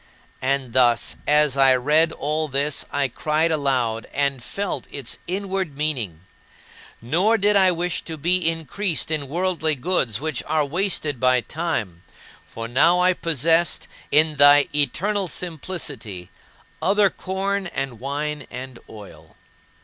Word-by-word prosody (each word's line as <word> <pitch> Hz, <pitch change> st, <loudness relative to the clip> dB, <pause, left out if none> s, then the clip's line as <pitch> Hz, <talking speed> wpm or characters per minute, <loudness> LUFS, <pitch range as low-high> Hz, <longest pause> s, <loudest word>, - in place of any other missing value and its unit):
And 130 Hz, -2 st, -1 dB
thus 120 Hz, -2 st, +2 dB
as 150 Hz, -2 st, +4 dB
I 135 Hz, -1 st, +5 dB
read 150 Hz, +6 st, +3 dB
all 155 Hz, +1 st, -1 dB
this, 140 Hz, +1 st, -1 dB
I 140 Hz, -1 st, +1 dB
cried 155 Hz, +6 st, 0 dB
aloud 130 Hz, -7 st, 0 dB
and 140 Hz, -3 st, -1 dB
felt 200 Hz, +9 st, -4 dB
its 140 Hz, -5 st, -6 dB
inward 190 Hz, -4 st, -3 dB
meaning. 125 Hz, -, -2 dB, 0.8 s
Nor 180 Hz, -, +2 dB
did 205 Hz, 0 st, +2 dB
I 190 Hz, -2 st, +5 dB
wish 175 Hz, 0 st, -2 dB
to 160 Hz, -, -6 dB
be 175 Hz, +5 st, +2 dB
increased 165 Hz, +2 st, -2 dB
in 150 Hz, -3 st, -1 dB
worldly 165 Hz, 0 st, 0 dB
goods 130 Hz, -, 0 dB
which 155 Hz, +2 st, -3 dB
are 155 Hz, -1 st, +1 dB
wasted 155 Hz, -4 st, -1 dB
by 130 Hz, 0 st, +3 dB
time, 120 Hz, -, -4 dB, 0.5 s
for 115 Hz, 0 st, -7 dB
now 165 Hz, +9 st, +4 dB
I 180 Hz, +1 st, +4 dB
possessed, 165 Hz, 0 st, +1 dB, 0.2 s
in 155 Hz, +1 st, +3 dB
thy 145 Hz, 0 st, +7 dB
eternal 185 Hz, +8 st, 0 dB
simplicity, 140 Hz, -, -5 dB, 0.5 s
other 200 Hz, 0 st, +3 dB
corn 195 Hz, +1 st, -3 dB
and 135 Hz, -8 st, -5 dB
wine 145 Hz, +2 st, -4 dB
and 125 Hz, 0 st, -8 dB
oil. 85 Hz, -7 st, -13 dB
150 Hz, 135 wpm, -22 LUFS, 130-175 Hz, 0.8 s, thy